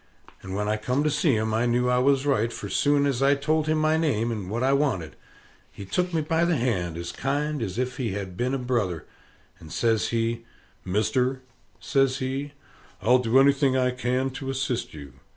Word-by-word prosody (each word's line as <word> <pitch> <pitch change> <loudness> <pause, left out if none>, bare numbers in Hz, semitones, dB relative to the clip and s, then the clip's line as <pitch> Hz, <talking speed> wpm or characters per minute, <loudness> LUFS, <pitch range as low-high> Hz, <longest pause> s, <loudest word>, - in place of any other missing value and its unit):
And 95 0 -6
when 105 +1 -1
I 105 0 +1
come 125 +6 -1
to 150 - +1
see 145 -2 +2
him, 110 0 -1
I 115 +2 +1
knew 120 +1 +1
I 125 0 +3
was 135 +1 +2
right; 115 -5 +1
for 100 - -6
soon 145 +7 +2
as 135 -3 0
I 140 +1 +4
told 155 +2 0
him 155 0 +2
my 155 +1 +2
name, 120 -8 0
and 105 -5 -5
what 115 +4 -2
I 135 +1 +3
wanted, 135 - 0 0.6
he 100 - -9
took 180 - -1
me 165 -2 0
by 160 +2 +1
the 170 -1 +2
hand 90 -10 -1
as 85 0 -5
kind 145 +1 -2
as 100 -2 -4
if 130 0 -2
he 115 -7 -2
had 95 -3 -5
been 125 +6 -1
a - - 0
brother, 120 -10 -2 0.5
and 80 - -13
says 115 -2 +1
he, 115 0 -1 0.4
"Mister," 125 +7 0 0.4
says 135 -1 +1
he, 135 +2 -4 0.5
"I'll 125 +5 +4
do 125 +1 +2
anything 135 -1 +4
I 125 -1 +2
can 125 +1 -1
to 135 +1 -6
assist 130 -7 -2
you. 70 -4 -10
125 Hz, 205 wpm, -25 LUFS, 110-140 Hz, 0.6 s, I